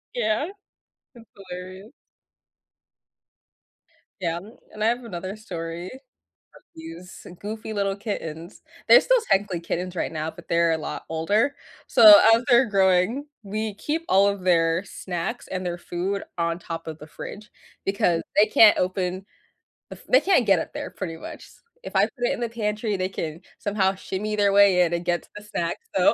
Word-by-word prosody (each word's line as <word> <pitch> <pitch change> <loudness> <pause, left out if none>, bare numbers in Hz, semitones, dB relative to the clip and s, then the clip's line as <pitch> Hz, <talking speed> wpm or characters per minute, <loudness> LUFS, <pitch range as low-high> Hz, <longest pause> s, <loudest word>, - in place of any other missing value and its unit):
Yeah. 220 +3 0 0.7
That's 235 -1 -15 0.2
hilarious. 185 +4 -9 2.3
Yeah. 170 -1 -1 0.3
And 215 - -5
I 220 - +3
have 240 +1 0
another 190 -2 -6
story 170 -4 -6
of 260 +2 -14 0.6
these 320 - -11
goofy 220 +1 -6
little 200 -1 -1
kittens. 175 -5 -6 0.3
They're - - +8
still - - +3
technically 195 -3 +1
kittens 180 +2 -4
right 170 - -2
now, 155 0 -3
but 175 - -15
they're 170 0 +2
a - - 0
lot 155 - -6
older. 205 - +1 0.3
So, 210 -3 +9
as 230 +2 +3
they're 240 +2 +6
growing, 195 +6 +2 0.2
we 215 +1 -3
keep 310 +9 -3
all 195 +1 +5
of 200 -1 -1
their 165 -1 +2
snacks 175 -3 -5
and 185 -1 -4
their 175 -1 -3
food 185 +3 -3
on 170 0 -1
top 165 -1 -7
of 160 -1 -7
the 150 - -11
fridge, 210 +6 -9 0.4
because 180 -4 +1 0.2
they 210 - +7
can't 215 -2 +6
open 185 0 -2 0.6
the - - -9
f - - -18
they - - +6
can't 365 -11 +3
get 195 -4 +4
up - - -6
there - - -5
pretty 165 -4 -6
much. - - -9 0.4
If - - -9
I - - +5
put - - -1 0.2
it - - 0
in - - -5
the 235 - -1
pantry, 210 -2 -2
they 185 - -1
can 160 -4 -5 0.2
somehow 200 -2 0
shimmy 210 +3 -4
their 205 -1 +3
way 200 -3 +6
in 175 -1 +2
and 170 0 -2
get 175 -1 0
to - - -22
the 210 - -9
snacks. 205 - -4
So, - - +5
195 Hz, 175 wpm, -24 LUFS, 175-215 Hz, 2.3 s, So